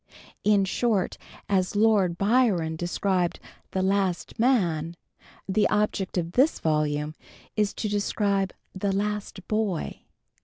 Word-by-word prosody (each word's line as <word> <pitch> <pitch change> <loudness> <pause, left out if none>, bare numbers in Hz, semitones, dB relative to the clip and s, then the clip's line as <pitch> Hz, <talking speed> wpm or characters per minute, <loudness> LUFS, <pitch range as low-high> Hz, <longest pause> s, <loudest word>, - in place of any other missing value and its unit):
In 205 -2 +4
short, 205 0 0 0.3
as 190 -1 +1
Lord 205 -5 +3
Byron 200 -7 +2
described 175 +1 0 0.3
"the 190 - -1
last 190 -1 0
man," 175 - +2 0.5
the 200 +2 +2
object 210 -3 0
of 170 -1 -1
this 270 - +3
volume 150 -1 0 0.4
is, 210 -2 +2
to 215 - -2
describe 200 -2 0 0.2
"the 195 +1 -1
last 205 -1 -3
boy." 215 -6 -1
195 Hz, 115 wpm, -26 LUFS, 175-210 Hz, 0.5 s, In